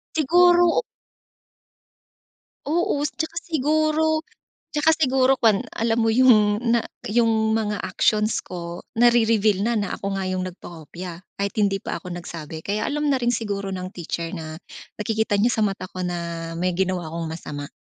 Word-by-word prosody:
Siguro 350 - +5 1.9
Oo 345 +4 +1
s - - -3
at - - -2
saka 335 - -10
siguro 310 +1 +1 0.3
at - - -71
saka 320 - +7
siguro 265 -3 +3
kuwan 225 +1 +3
alam 225 0 0
mo 225 -1 +2
yung 215 -4 +5
na 235 -1 +1 0.2
yung 220 0 +2
mga 210 -3 -1
actions 215 0 +1
ko 170 -1 -7
nari-reveal 225 -4 +3
na 235 - +1
na 200 - -2
ako 200 0 -4
nga 190 -1 -2
yung 185 0 -1
nagpakopya 175 0 -9 0.2
kahit 200 0 -1
hindi 200 -2 +1
pa - - -4
ako 180 -1 -7
nagsabi 165 -2 -7
kaya 205 +5 -2
alam 295 +1 -1
na 280 - +3
rin 240 -1 +1
siguro 200 -4 -3
ng 185 -1 -4
teacher 170 -1 -4
na 160 +1 -7 0.4
nakikita 215 -1 0
niya 235 - +4
sa 220 - +2
mata 195 -2 -3
ko 185 -1 -5
na 170 -1 -4
may 180 -1 0
ginawa 185 -3 -1
akong 165 +1 -4
masama. 145 -3 -6
210 Hz, 160 wpm, -23 LUFS, 180-245 Hz, 1.9 s, saka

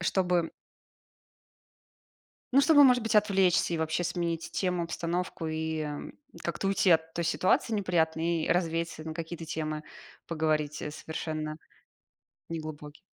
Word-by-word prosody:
чтобы 175 -2 +1 2.0
Ну, 275 - +7
чтобы, 290 -1 +7
может 250 -3 +6
быть, 225 - -1
отвлечься 195 -5 +3
и - - -1
вообще 160 +2 0
сменить 170 -1 -2
тему, 180 -2 0
обстановку 170 0 -3
и 160 -1 -2 0.6
как-то - - -2
уйти 195 -1 +3
от 160 -1 +3
той 170 - -1
ситуации 185 +6 +2
неприятной, 165 -4 +1
и - - -4
развеяться 165 -2 0
на 160 0 -5
какие-то 165 0 -5
темы, 155 -1 -3 0.4
поговорить, 155 -2 -1
э, 150 - -3
совершенно 155 0 -5 0.9
неглубокие. 155 -2 -7
165 Hz, 125 wpm, -29 LUFS, 160-180 Hz, 2.0 s, Ну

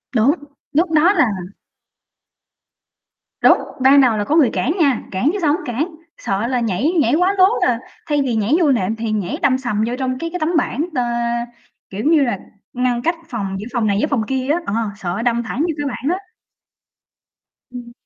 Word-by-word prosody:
Đúng, 240 +7 +4 0.4
lúc 325 +3 +2
đó 325 +6 +4
là 335 - +4 2.2
Đúng, - - +6 0.2
ban 275 +2 +6
đầu 240 -5 +3
là 205 - 0
có 290 - 0
người 300 -7 +5
cản 185 +11 0
nha, 275 -7 +3
cản 195 +10 +1
chứ - - -2
sao 295 -3 +3
hổng 360 - -2
cản, 300 +7 -3 0.2
sợ 200 +4 -2
là 250 -1 0
nhảy 230 - 0
nhảy 320 -5 +2
quá 365 +4 +2
lố 370 - +7 0.2
là 235 -2 +2 0.3
thay 295 -1 +1
vì 255 -4 -1
nhảy 220 +4 +1
vô 305 -5 +3
nệm 220 -4 0
thì 225 -1 -3
nhảy 205 -4 -2
đâm 260 -1 +3
sầm 230 -5 -1
vô 240 - -2
trong 255 -1 -1
cái 335 - -3
cái 360 +2 -5
tấm 310 0 0
bảng, 300 0 0
ờ, 250 - +1 0.9
kiểu 200 +3 -5
như, 315 -1 +4
là 240 -7 -1 0.3
ngăn 245 -1 0
cách 335 +6 0
phòng 200 -6 -3
giữa 210 - -6
phòng 235 -4 +1
này 200 -1 +1
với 300 - +1
phòng 260 -6 0
kia 265 -1 -2
á, 340 - +1
ờ, - - -3 0.2
sợ 190 +1 -3
đâm 235 0 +1
thẳng 230 +4 -5
vô 330 - +1
cái 290 - -3
bảng 270 +2 -3
á. 395 - -13 1.5
Ừm. 245 -1 -9
255 Hz, 205 wpm, -19 LUFS, 225-305 Hz, 2.2 s, lố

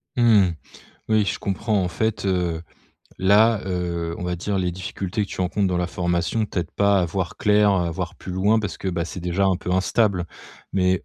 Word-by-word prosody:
Mmh 125 - +1 0.3
mh. 85 - -5 0.5
Oui, 110 -1 +3
je - - -2
comprends 100 0 0
en 90 - 0
fait, 110 +5 -2
heu, 90 -4 0 0.6
là, 105 +3 +4
heu, 85 -2 -2
on - - -5
va 90 0 -2
dire, 100 +3 -2
les 90 -1 0
difficultés 95 +3 -3
que - - -16
tu - - -5
rencontres 95 +2 0
dans 90 - 0
la 90 0 0
formation, 90 +5 -1
t'aident 90 -4 -3
pas 100 -1 +3
à 90 - +2
voir 85 +1 -3
clair, 105 0 +4
heu, 90 -2 +1
à - - -2
voir 80 - -4
plus 90 - -8
loin 100 +5 +3
parce 105 -4 -4
que, 95 - -3
bah, 85 -2 -1
c'est 90 - -7
déjà 90 +3 0
un 95 -2 +3
peu 90 - -5
instable. 95 -1 +1 0.5
Mais 95 -1 +1
95 Hz, 215 wpm, -23 LUFS, 90-100 Hz, 0.6 s, là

